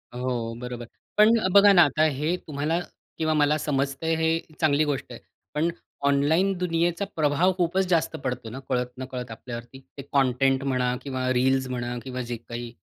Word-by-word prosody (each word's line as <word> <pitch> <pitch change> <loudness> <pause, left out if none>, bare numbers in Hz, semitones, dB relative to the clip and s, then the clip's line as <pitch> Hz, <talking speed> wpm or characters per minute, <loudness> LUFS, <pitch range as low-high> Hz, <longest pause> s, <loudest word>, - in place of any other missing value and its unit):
हो, 120 -2 -2
बरोबर. 125 -1 -6 0.3
पण 210 +1 +7 0.2
बघा 200 0 +8
ना, 175 - +8
आता 155 +2 +2
हे 155 +3 +1
तुम्हाला 150 +3 -1 0.4
किंवा 160 -1 +1
मला 150 0 +3
समजतंय, 145 +2 -1
हे 160 0 +1 0.2
चांगली 155 -2 +3
गोष्ट 145 -3 -3
आहे. - - -8 0.3
पण 160 +3 +1 0.4
ऑनलाईन 160 +8 +3
दुनियेचा 175 +2 0
प्रभाव 160 +4 +2
खूपच 185 +2 +1
जास्त 165 -2 +1
पडतो 125 -3 -3
ना, 130 +4 -7
कळत 125 -1 0
नकळत 125 -2 -6
आपल्यावरती. 120 +2 -8 0.2
ते - - -5
कंटेंट 135 0 +2
म्हणा, 125 -2 0
किंवा 130 -2 -3
रील्स 130 +1 +2
म्हणा, 120 -1 -3
किंवा 130 -1 -5
जे 120 -1 -4
काही 120 0 -7
140 Hz, 165 wpm, -25 LUFS, 125-160 Hz, 0.4 s, बघा